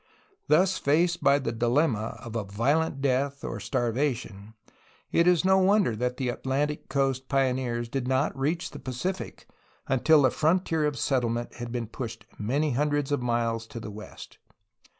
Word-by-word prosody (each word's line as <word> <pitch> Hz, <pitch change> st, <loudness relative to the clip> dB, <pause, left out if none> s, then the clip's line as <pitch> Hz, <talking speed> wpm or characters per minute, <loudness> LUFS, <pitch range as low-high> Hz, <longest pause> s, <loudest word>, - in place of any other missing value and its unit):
Thus 185 Hz, +5 st, +3 dB
faced 170 Hz, +4 st, +2 dB
by 140 Hz, 0 st, +5 dB
the 130 Hz, -5 st, -2 dB
dilemma 120 Hz, -1 st, 0 dB
of 115 Hz, -1 st, -8 dB
a 110 Hz, -, -1 dB
violent 135 Hz, +9 st, 0 dB
death 140 Hz, +1 st, 0 dB
or -, -, -4 dB
starvation, 115 Hz, -4 st, -2 dB, 0.6 s
it 170 Hz, +1 st, +3 dB
is 180 Hz, 0 st, +4 dB
no 190 Hz, 0 st, +5 dB
wonder 190 Hz, -, +3 dB
that 125 Hz, +2 st, -2 dB
the 130 Hz, -2 st, -1 dB
Atlantic 140 Hz, +4 st, -2 dB
coast 135 Hz, -2 st, 0 dB
pioneers 130 Hz, -3 st, 0 dB
did 125 Hz, +1 st, -3 dB
not 130 Hz, +3 st, +1 dB
reach 150 Hz, +6 st, -1 dB
the -, -, -9 dB
Pacific 180 Hz, +9 st, -5 dB, 0.4 s
until 145 Hz, +3 st, +4 dB
the 130 Hz, -, +4 dB
frontier 160 Hz, -1 st, +1 dB
of 150 Hz, -2 st, -1 dB
settlement 120 Hz, -3 st, -1 dB
had 120 Hz, -1 st, -6 dB
been 120 Hz, -1 st, -2 dB
pushed 115 Hz, -1 st, -7 dB
many 140 Hz, +8 st, 0 dB
hundreds 145 Hz, +2 st, 0 dB
of 145 Hz, -, +1 dB
miles 115 Hz, -1 st, -1 dB
to 115 Hz, -, -8 dB
the 105 Hz, -, -7 dB
west. 105 Hz, +1 st, -11 dB
130 Hz, 160 wpm, -27 LUFS, 120-150 Hz, 0.6 s, by